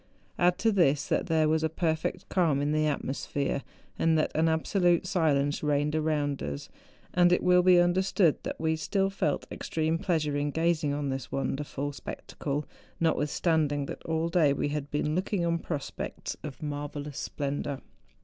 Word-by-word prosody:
Add 175 0 +4
to 225 - +2
this, 150 -8 +3
that - - +1
there 160 -2 +3
was 155 +1 +2
a 160 - +1
perfect 160 -1 -2
calm 165 -7 +2
in 145 +1 0
the 155 0 +2
atmosphere, 140 -1 -2 0.4
and 165 -1 +3
that 155 - +1
an 160 +1 +2
absolute 175 +2 +2
silence 145 -7 +1
reigned 150 0 +1
around 150 -3 0
us, 70 -1 -5 0.4
and 175 0 +5
it 180 - +3
will 180 0 +5
be 180 0 +6
understood 175 -1 +3
that - - -5
we 160 0 +1
still 195 +5 0
felt 150 -7 -1
extreme 160 +1 -1
pleasure 155 -6 0
in 145 0 0
gazing 160 -1 +1
on 145 -1 -2
this 135 -2 -3
wonder¬ 135 +1 -2
ful 145 0 -4
spectacle, 145 +1 -5 0.3
notwithstanding 150 -2 +1
that - - -7
all 160 0 0
day 165 -4 +3
we 145 - -1
had 145 -1 -3
been 150 +1 -1
looking 185 +1 0
on 170 0 +1
prospects 150 -4 -5
of 150 0 -8
marvellous 145 -1 -5
splendour. 140 -1 -3
155 Hz, 170 wpm, -28 LUFS, 145-170 Hz, 0.4 s, be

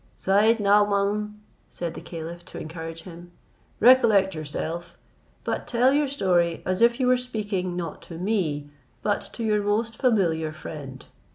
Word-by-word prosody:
"Syed 215 +4 +3
Naomaun," 205 +1 +2 0.3
said 170 -2 -5
the - - -8
caliph, 170 +1 -7
to - - -9
encourage 165 +1 -7
him, 175 -1 -11 0.5
"recollect 215 -6 +5
yourself, 160 +2 -5 0.5
but - - -3
tell 250 +3 +3
your 290 0 +2
story 180 -10 +1
as 185 +2 -1
if 235 +1 +4
you 255 - +2
were 250 0 +4
speaking 205 -7 -3
not 170 -3 -5
to 165 - -9
me, 165 -7 -1 0.3
but 205 -1 +1
to 235 - -5
your 210 -1 +2
most 220 +2 -1
familiar 170 - +2
friend. 145 -4 -9
195 Hz, 150 wpm, -25 LUFS, 165-220 Hz, 0.5 s, recollect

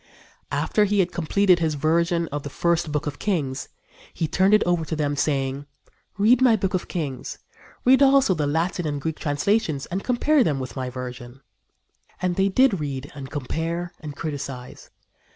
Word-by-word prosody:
After 210 - +2
he 205 0 0
had 180 -2 +2
completed 180 +2 +2
his 160 -2 0
version 170 +3 +1
of 145 +1 -3
the 145 - -6
first 170 +3 0
Book 150 0 -1
of 145 -1 -5
Kings, 145 -10 -2 0.4
he 160 - -2
turned 190 +6 +4
it 215 - +3
over 175 -2 +1
to 160 - -3
them, 145 -1 -1
saying: 140 -1 -1 0.5
"Read 225 +5 +4
my 250 -3 +6
Book 190 -3 -2
of 185 - -1
Kings 145 -7 -4 0.5
read 260 +2 +6
also 270 -6 +5
the 150 -4 -1
Latin 165 +3 -1
and 145 -1 -2
Greek 160 +2 -4
translations 155 0 0
and 190 +3 -4
compare 265 +3 +3
them 145 -9 0
with 130 -1 -6
my 130 -2 -3
version." 125 0 -8 0.8
And 180 -1 0
they 195 +1 +2
did 235 -2 +3
read 140 -2 -5
and 135 -1 -8
compare 165 +5 -3
and 150 -3 -8
criticise. 140 -5 -6
160 Hz, 175 wpm, -24 LUFS, 145-190 Hz, 0.8 s, my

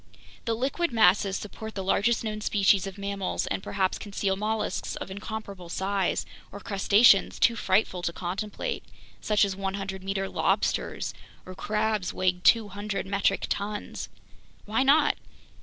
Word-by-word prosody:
The 230 - 0
liquid 275 +7 -1
masses 195 -2 +4
support 220 +1 -8
the 195 - -3
largest 220 +5 +2
known 215 -1 -3
species 200 -2 +3
of 195 - -8
mammals 200 -1 -2
and - - -2
perhaps 190 -1 -1
conceal 200 -1 -1
mollusks 215 +1 -2
of - - -6
incomparable 200 -3 -7
size 195 +1 0 0.3
or 200 - -8
crustaceans 200 +1 +4
too 235 - +4
frightful 190 -3 +1
to 175 - -1
contemplate, 205 - -4 0.4
such 210 -1 +3
as 195 -1 -3
100 195 0 -4
meter 195 0 -2
lobsters - - 0 0.3
or 185 - -8
crabs 210 0 -1
weighing 180 -1 +1
200 205 -2 +2
metric 195 0 +1
tons! 205 +1 -4 0.6
Why 220 +4 +1
not? 280 +4 +4
200 Hz, 140 wpm, -27 LUFS, 190-215 Hz, 0.6 s, masses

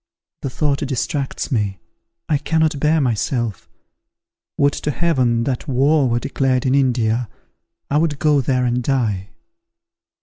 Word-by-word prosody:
The 135 - -3
thought 140 +1 0
distracts 140 +1 -2
me; 105 -6 0 0.5
I 150 -3 +1
cannot 160 -1 +1
bear 155 +2 +3
myself! 120 -3 -1 0.9
Would 140 0 +3
to - - -3
Heaven 130 -8 +1
that 130 -1 -3
war 140 +1 +3
were 120 - +1
declared 130 0 0
in 130 - +2
India! 120 -4 +1 0.6
I 145 - +1
would 155 -3 0
go 150 -1 +3
there 125 0 +1
and 125 0 0
die." 110 -8 -1
135 Hz, 135 wpm, -20 LUFS, 120-145 Hz, 0.9 s, bear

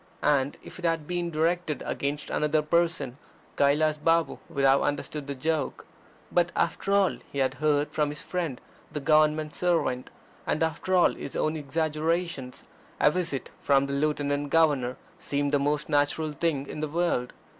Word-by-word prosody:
And, 140 -1 +2
if - - -11
it 175 - -4
had 165 -2 +1
been 175 +1 -2
directed 165 0 0
against 145 +1 -3
another 150 0 +1
person, 150 -5 0 0.4
Kailas 150 +2 +3
Balm 165 -1 +2
would 140 - -2
have 135 +1 +5
understood 145 0 -2
the 140 - -3
joke. 155 +1 -2 0.5
But 175 0 +2
after 195 - 0
all 200 -2 +3
he - - -7
had 135 -1 +2
heard 150 -1 +2
from 150 -1 +1
his 145 0 -6
friend 170 -8 -3 0.3
the 150 - -3
Government 155 +1 +3
servant, 165 -8 0 0.4
and 155 - +1
after 160 +4 0
all 180 - +5
his 140 - -7
own 155 +1 0
exaggerations, 155 -1 -2 0.4
a 150 - +5
visit 165 -6 -2
from 140 -1 +3
the 140 - -4
Lieutenant 145 0 0
Governor 140 -6 +2 0.2
seemed 145 0 -1
the 145 - +3
most 145 +1 0
natural 150 +1 +1
thing 150 -2 -1
in 145 - -7
the 155 - -1
world. 165 -6 0
150 Hz, 165 wpm, -27 LUFS, 140-165 Hz, 0.5 s, have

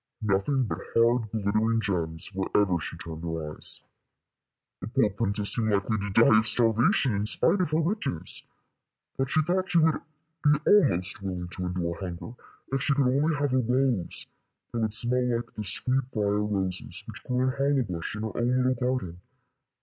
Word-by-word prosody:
Nothing 105 +7 +1
but 115 - -3 0.2
hard 115 -1 +3
glittering 110 +2 +1
gems 85 -5 -3
wherever 95 -1 +1
she - - -6
turned 80 -1 -8
her 80 -3 -4
eyes. - - -4 1.0
The - - -6
poor 115 -3 +2
princess 100 0 +3
seemed 110 -2 +1
likely 100 +2 0
to 100 +1 -3
die 110 +2 +6
of 110 - +1
starvation 120 - +3
in 105 +1 0
spite 185 - +2
of 180 - 0
her 155 +1 +1
riches, 175 - -2 0.7
but 135 -1 -1
she 155 - +2
thought 185 +4 -1
she 175 - +2
would 160 -1 +3 0.4
be 150 -1 +4
almost 100 - +3
willing 90 -2 -4
to 90 0 -5
endure 90 -1 -3
hunger 95 +4 -6 0.4
if 135 - +1
she 140 - +1
could 140 -1 +2
only 150 +3 +2
have 145 -2 -1
a 130 - +3
rose 125 -5 0 0.5
that 120 - -1
would 110 -1 0
smell 125 +1 +2
like 120 - -8
the 105 - -5
sweet 125 +6 -1
brier 105 -2 0
roses 95 -3 -3
which - - -10
grew 125 0 -1
in 130 0 +2
Hollowbush 130 - -1
in 105 - -4
her 110 - -5
own 120 +2 +1
little 130 0 +2
garden. 125 -9 -3
110 Hz, 180 wpm, -27 LUFS, 100-130 Hz, 1.0 s, die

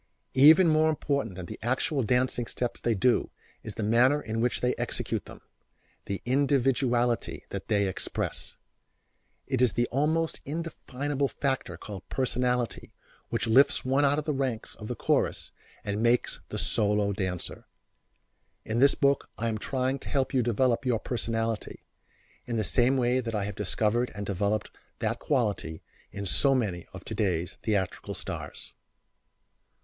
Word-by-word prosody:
Even 155 +7 +8
more 155 0 +4
important 140 -9 -1
than 90 -1 -6
the - - -8
actual 130 +5 0
dancing 125 0 +1
steps 120 -1 -3
they 115 -2 +1
do 120 +5 +2 0.3
is - - -8
the 110 - -3
manner 120 +7 +4
in 115 -4 -3
which 120 +1 +1
they 125 0 +2
execute - - -3
them - - -12 0.7
the 100 - -3
individuality 125 -3 +1
that - - -5
they 100 -2 +2
express. 95 - -3 0.9
It 130 -2 -1
is 125 - +4
the 120 - +2
almost 155 +4 +1
indefinable 145 -3 -3
factor 130 - -2
called 100 0 -9
personality 125 -2 -1 0.4
which - - -1
lifts 130 +5 +4
one 135 +2 +2
out 140 +1 +3
of 150 - -2
the 150 - 0
ranks 130 -5 -2
of 105 - -9
the 125 - -3
chorus - - 0 0.3
and 105 +1 -2
makes 120 +1 +2
the - - -4
solo 105 -1 +1
dancer. 95 -3 -4 1.0
In 110 +2 -1
this 140 +2 +6
book 140 0 +2
I 115 +1 -1
am 110 -1 -2
trying 130 +4 -1
to - - -9
help 135 -1 0
you 130 - +3
develop 120 +2 +1
your 125 -3 +2
personality, 115 -1 -3 0.6
in 120 -1 -1
the 110 - +1
same 125 +5 +3
way 125 0 +2
that 115 -3 -3
I 105 - 0
have 100 +1 -3
discovered 110 +5 0
and 100 0 -4
developed 100 +2 -1 0.3
that - - -1
quality 105 - -1 0.3
in 100 0 -5
so 135 +9 +3
many 95 -9 -1
of - - -10
today's 90 -4 -1
theatrical 100 -5 -1
stars. - - -6
120 Hz, 155 wpm, -28 LUFS, 105-135 Hz, 1.0 s, Even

